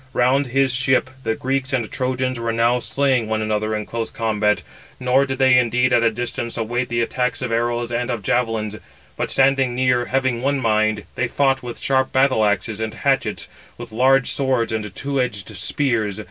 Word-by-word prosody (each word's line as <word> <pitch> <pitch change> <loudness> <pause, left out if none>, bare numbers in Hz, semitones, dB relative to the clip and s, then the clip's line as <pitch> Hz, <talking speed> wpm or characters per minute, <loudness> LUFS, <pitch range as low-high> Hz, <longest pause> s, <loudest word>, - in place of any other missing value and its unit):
Round 130 +3 +2
his 135 +1 +1
ship 130 0 +1
the 110 -2 -1
Greeks 135 +2 -2
and 120 -5 -1
Trojans 130 -1 -2
were 115 0 -1
now 115 +2 +2
slaying 130 -2 0
one 110 0 0
another 110 0 -1
in 105 -1 -3
close 115 -1 -4
combat; 105 -2 0 0.4
nor 130 +2 +2
did 135 0 -3
they 130 -1 +5
indeed 125 +1 +1
at 120 - +4
a 115 - +4
distance 120 +1 -4
await 120 +2 -2
the 120 -1 0
attacks 125 +1 -1
of 125 - -3
arrows 120 +1 -1
and 120 +1 -2
of 115 -4 -3
javelins, 110 -2 -1 0.4
but - - -3
standing 135 -2 +2
near, 125 -1 +2
having 130 -2 0
one 140 +1 0
mind, 110 -3 +1
they 125 - -1
fought 135 +1 +1
with 120 -1 -7
sharp 130 -1 0
battle 130 -4 +3
axes 105 +1 0
and 110 0 -3
hatchets, 135 +2 -1 0.3
with 120 -1 -9
large 130 +3 +3
swords 130 -4 0
and 105 -3 -4
two 140 -1 -1
edged 110 -4 -4
spears. 110 +1 -1
120 Hz, 190 wpm, -21 LUFS, 110-130 Hz, 0.4 s, they